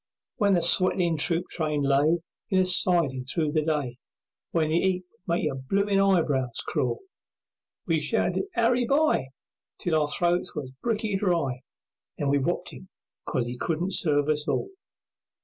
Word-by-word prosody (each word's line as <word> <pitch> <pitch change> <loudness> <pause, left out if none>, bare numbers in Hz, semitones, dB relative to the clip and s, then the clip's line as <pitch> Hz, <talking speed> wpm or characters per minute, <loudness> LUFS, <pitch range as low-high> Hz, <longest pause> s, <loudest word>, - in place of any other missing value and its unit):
When 200 -5 +3
the 170 - +1
sweatin' 175 -1 +3
troop 165 +3 +2
train 150 -3 -1
lay 145 +5 +2 0.3
In 190 - +1
a 185 - +4
sidin' 170 -7 +2
through 150 +3 0
the 155 0 +1
day, 145 -6 -2 0.5
When 160 -2 0
the 160 - +2
'eat 185 0 0
would 175 -2 -4
make 180 - -2
your 145 -4 -1
bloomin' 195 +9 0
eyebrows 155 -11 +1
crawl, - - -1 0.8
We - - +1
shouted - - 0
"Harry 245 -2 +2
By!" 280 - +2 0.5
Till 160 -3 0
our 150 - 0
throats 175 +3 0
were 150 -3 -4 0.2
bricky 215 -3 -1
dry, 165 -10 0 0.6
Then 145 - -1
we 140 0 +2
wopped 130 - -2
him - - -12 0.4
'cause 120 - -1
'e 120 +1 -6
couldn't 175 +3 -1
serve 145 -5 +3
us 150 +1 0
all. 390 - -1
165 Hz, 160 wpm, -26 LUFS, 145-185 Hz, 0.8 s, a